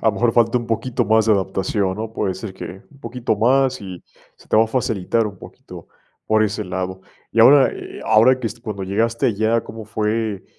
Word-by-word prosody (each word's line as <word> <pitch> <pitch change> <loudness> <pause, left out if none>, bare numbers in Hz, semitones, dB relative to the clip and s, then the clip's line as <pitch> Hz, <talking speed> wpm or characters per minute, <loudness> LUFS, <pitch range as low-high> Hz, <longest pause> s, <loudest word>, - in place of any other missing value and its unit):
lo 110 - +4
mejor 115 +4 +1
falta 115 +1 +3
un 120 - -7
poquito 115 +2 -1
más 110 +1 +3
de 110 - +5
adaptación, 95 0 -1
¿no?, 110 0 -5
puede 95 -4 -2
ser, 95 0 -8
que 95 +1 -9
un 140 - -20
poquito 120 -3 -2
más 130 +3 +2
y 95 -3 -9 0.3
se - - -21
te - - +2
va 110 - +6
a - - -5
facilitar 115 -2 0
un 100 -3 -8
poquito - - -13 0.4
por 110 0 +3
ese 105 0 -1
lado, 95 0 -4 0.3
y 115 - +3
ahora, 135 +3 +7
eh, - - -9
ahora 110 +4 +5
que 120 - -3
es 115 +2 -6
cuando 105 -5 -5
llegaste 115 +4 0
allá, 110 +1 +1
¿cómo 110 -1 -9
fue, 110 -1 -2
110 Hz, 210 wpm, -20 LUFS, 100-115 Hz, 0.4 s, ahora